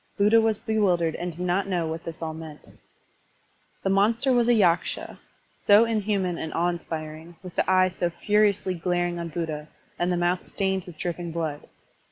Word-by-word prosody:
Buddha 210 +3 +5
was 220 -1 +1
bewildered 180 -8 +1
and 175 0 -3
did 170 +2 -9
not 185 +2 +1
know 180 -4 0
what 160 +1 -5
this 165 +1 -7
all 160 -1 -3
meant. 160 -1 -10 1.1
The 195 - +1
monster 225 +7 +3
was 240 -1 +3
a 240 - +5
Yaksha, 180 -5 +1 0.4
so 210 +3 +6
inhuman 205 -5 -1
and 160 - -4
awe 175 +1 +2
inspiring, 160 -1 -6
with 180 -2 -9
the - - +1
eye 185 0 +4
so 175 -1 -1
furiously 205 +1 +1
glaring 175 0 -1
on 170 0 -4
Buddha, 155 -2 -4 0.3
and 175 +1 +1
the 175 - +1
mouth 175 +1 0
stained 190 -2 -1
with 175 -3 -11
dripping 175 0 -4
blood. 160 -3 -4
175 Hz, 180 wpm, -25 LUFS, 165-200 Hz, 1.1 s, so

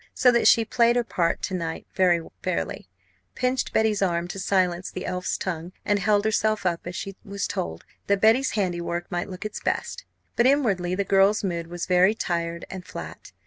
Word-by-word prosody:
So 250 - +5
that 235 -1 +3
she 230 - +6
played 235 0 +3
her 245 - +2
part 170 -7 -1
to 190 - -2
night 165 -3 -3
very 175 -3 +2
fairly; - - -3 0.5
pinched 255 0 0
Betty's 220 -2 +2
arm 175 -2 +1
to 195 - -5
silence 185 -1 +1
the 185 - -6
elf's 180 0 -2
tongue; 175 -1 -4
and 205 -1 +2
held 205 0 +2
herself 215 -1 +1
up 170 -1 -1
as 175 - -5
she 195 0 -5
was 200 0 -3
told, 80 -1 -4 0.2
that 200 0 +2
Betty's 225 +6 +4
handiwork 175 -3 -2
might 175 +2 -2
look 185 +2 -7
its 215 - -4
best. - - -3 0.3
But 235 - +4
inwardly 200 -11 +2
the 200 - 0
girl's 195 +2 +3
mood 170 -3 -2
was 175 0 -5
very 185 +3 +4
tired 170 -3 -2
and 185 -1 -7
flat. 85 - -9
190 Hz, 190 wpm, -25 LUFS, 175-215 Hz, 0.5 s, she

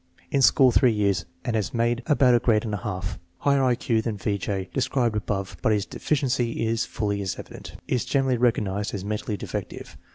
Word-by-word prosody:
In 140 - +2
school 130 0 +6
three 125 0 +4
years 100 -2 +1 0.2
and 120 - -1
has 110 +1 -1
made 120 +1 +1
about 140 -5 +4
a 120 - +5
grade 110 -2 +2
and 105 - -3
a - - 0
half. 95 -4 -4
Has 95 - -5 0.2
higher 140 -1 +3
I 125 -2 +3
Q 115 -2 0
than 110 -2 -3
V. 100 0 -1
J. 95 0 -3
described 125 -3 0
above, 100 -2 -3
but - - +2
his 105 -2 +1
deficiency 125 -5 -1
is 115 +1 0
fully 100 -1 -2
as 95 -2 -3
evident. - - -10
Is 125 - 0
gener 135 +2 +1
ally 130 -1 +1
recognized 105 -4 0
as 95 -1 -5
mentally 105 0 -3
defective. - - -6
115 Hz, 215 wpm, -25 LUFS, 105-125 Hz, 0.2 s, school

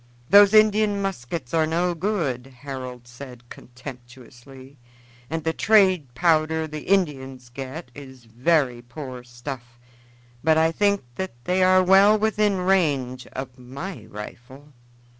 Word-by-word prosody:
"Those 205 +1 +7
Indian 215 -1 +4
muskets 165 -8 -4
are 160 -1 +2
no 175 +2 0
good," 160 - -2
Harold 130 -3 -7
said 120 -1 -12
contemptuously, 130 +1 -13 0.5
"and 160 0 -3
the 160 +1 0
trade 185 - +3
powder 160 0 +2
the 155 -1 -8
Indians 135 -9 -1
get 135 +3 -8
is 130 -3 -12
very 125 +1 +1
poor 125 0 -9
stuff; 120 0 -9 0.7
but 160 +1 +4
I 160 0 +3
think 200 +1 +1
that 190 0 -4
they 185 +1 0
are 185 0 +5
well 195 +3 +6
within 210 -2 +1
range 145 -10 0
of 130 -1 -8
my 140 +9 -8
rifle." 125 +7 -11
145 Hz, 125 wpm, -23 LUFS, 125-185 Hz, 0.7 s, Those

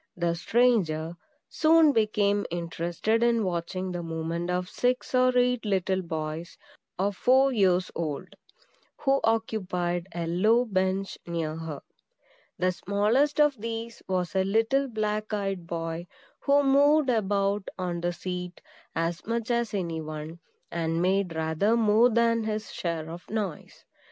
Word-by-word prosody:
(the 170 -1 +1
stranger) 175 -5 +1 0.3
soon 320 -1 +5
became 210 -3 +2
interested 170 +6 -1
in 235 -1 +3
watching 185 +1 -3
the 175 -1 -3
movement 165 +1 -3
of 180 0 -1
six 250 +7 -1
or 255 0 +4
eight 250 -1 +2
little 190 -2 0
boys, 160 -1 -5 0.4
of 195 +1 0
four 265 +5 +4
years 185 -4 +2
old, 165 +2 -4 0.7
who 275 -1 +3
occupied 185 -6 -1
a 170 -1 -2
low 215 +9 +3
bench 190 -2 -1
near 165 -2 -2
her. 160 -3 -6 0.8
The 185 0 +2
smallest 210 +11 +1
of 290 -7 +3
these 230 0 -5
was 180 -3 -1
a 190 - +3
little 225 +8 +2
black 215 -2 -2
eyed 195 -4 -3
boy, 165 +1 -4 0.3
who 285 0 +3
moved 285 +1 +4
about 200 -2 0
on 175 -2 -3
the 175 0 0
seat 180 0 -5 0.4
as 165 +1 -1
much 230 0 -1
as 235 -1 0
any 170 -5 -2
one, 155 +2 -7 0.3
and 165 -1 -1
made 185 -1 +1
rather 160 +8 +1
more 225 +2 +5
than 230 -1 +2
his 215 0 -3
share 165 -2 -3
of 170 +2 -9
noise. 205 -7 -5
190 Hz, 140 wpm, -27 LUFS, 170-230 Hz, 0.8 s, soon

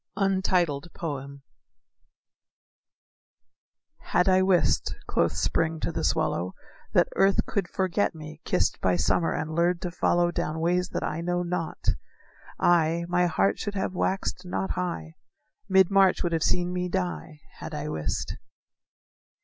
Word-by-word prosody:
_ 170 -7 -1 2.6
"Had 180 - +1
I 185 0 +5
wist," 185 -5 +2
quoth - - +1
Spring 155 - 0
to - - -1
the - - -3
swallow, 90 +2 0 0.4
"That - - +4
earth 195 0 +3
could 200 -4 -1
forget 185 -1 0
me, 155 0 -10
kissed - - 0
By 90 -1 +2
summer, 90 - +1
and 155 0 -3
lured 170 +1 +2
to 180 - -3
follow 175 0 +2
Down 160 -1 -2
ways 180 +2 +1
that - - -3
I 165 - -2
know 175 +1 -1
not, 175 -2 -2 0.7
I, 170 0 +3
My 180 0 +3
heart 100 - +1
should 205 - -4
have 190 -1 -2
waxed 190 +1 -1
not 185 +1 -2
high, 170 -3 -4 0.5
Mid 190 -1 +5
March 195 -2 +4
would 175 - 0
have 165 -1 0
seen 180 +1 +1
me 180 0 -2
die, 175 -4 -3 0.2
Had 160 -1 -6
I 150 0 -4
wist." 80 - -3
175 Hz, 140 wpm, -27 LUFS, 155-180 Hz, 2.6 s, I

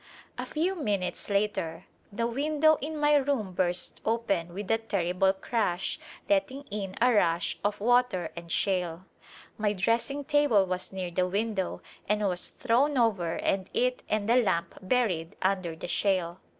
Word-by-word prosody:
A - - -4
'i^vi 345 +5 -1
minutes 200 - -2
later 200 -5 -1 0.3
the 230 +3 -1
window 300 +5 +2
in 310 +3 -4
my 295 0 +3
room 275 -8 +1
burst 175 0 0
open 200 -7 0
with 200 +3 -4
a 225 - +3
ter 210 -5 -1
rible 190 +2 +1
crash 195 -6 -1 0.3
letting 285 -2 +1
in 195 -2 -4
a 250 +1 +4
rush 170 -5 +1
of 205 0 0
water 235 -6 +2
and 170 -1 -8
shale. 180 -2 0 0.5
My 210 -1 +1
dressing 230 +8 0
table 290 -9 +3
was 185 0 -4
near 185 -2 -4
the 180 +1 +1
window 200 0 -2 0.3
and 210 -1 +2
was 180 -2 -2
thrown 260 +4 +1
over 200 -9 +2
and 190 -1 -1
it 250 0 +1
and 215 -1 0
the 235 +2 +5
lamp 190 -8 +1
buried 185 -6 0
under 185 -3 0
the 160 - -7
shale. 185 -2 0
205 Hz, 160 wpm, -28 LUFS, 180-245 Hz, 0.5 s, the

